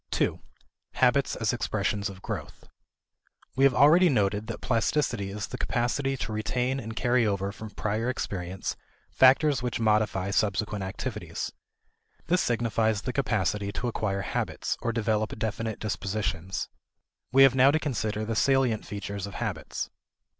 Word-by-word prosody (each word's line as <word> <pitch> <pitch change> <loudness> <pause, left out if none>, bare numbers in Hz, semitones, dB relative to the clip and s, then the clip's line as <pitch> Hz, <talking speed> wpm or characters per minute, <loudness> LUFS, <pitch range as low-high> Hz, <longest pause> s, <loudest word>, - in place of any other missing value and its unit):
2. - - 0 0.5
Habits - - +3
as - - 0
Expressions 100 -1 -1
of 95 -1 -11
Growth. - - -6 0.9
We 135 - +4
have 135 -3 +4
already 165 +7 +6
noted 105 -4 +1
that 115 - -5
plasticity 115 -3 0
is 100 0 -4
the - - -7
capacity 135 +3 0
to 115 - -4
retain 125 +5 -1
and 115 -2 -6
carry 120 -2 +2
over 100 -1 -1
from 110 +1 -8
prior 110 +3 -2
experience 95 -6 -3 0.4
factors 135 +1 +5
which 120 -2 -2
modify 105 -3 +1
subsequent 105 0 0
activities. 95 0 -4 0.7
This 175 +4 +2
signifies 115 -2 +1
the 125 - -3
capacity 105 -6 0
to 125 - -2
acquire 100 -4 -1
habits, - - -2
or 115 - 0
develop 110 -1 -1
definite 110 0 -3
dispositions. 100 -3 -2 0.6
We 135 +1 +7
have 135 -2 +7
now 130 +1 +6
to 150 - +3
consider 110 -8 -2
the 115 0 -2
salient 130 -3 +2
features 100 -1 -5
of 100 - -9
habits. - - -4
110 Hz, 145 wpm, -27 LUFS, 100-125 Hz, 0.9 s, We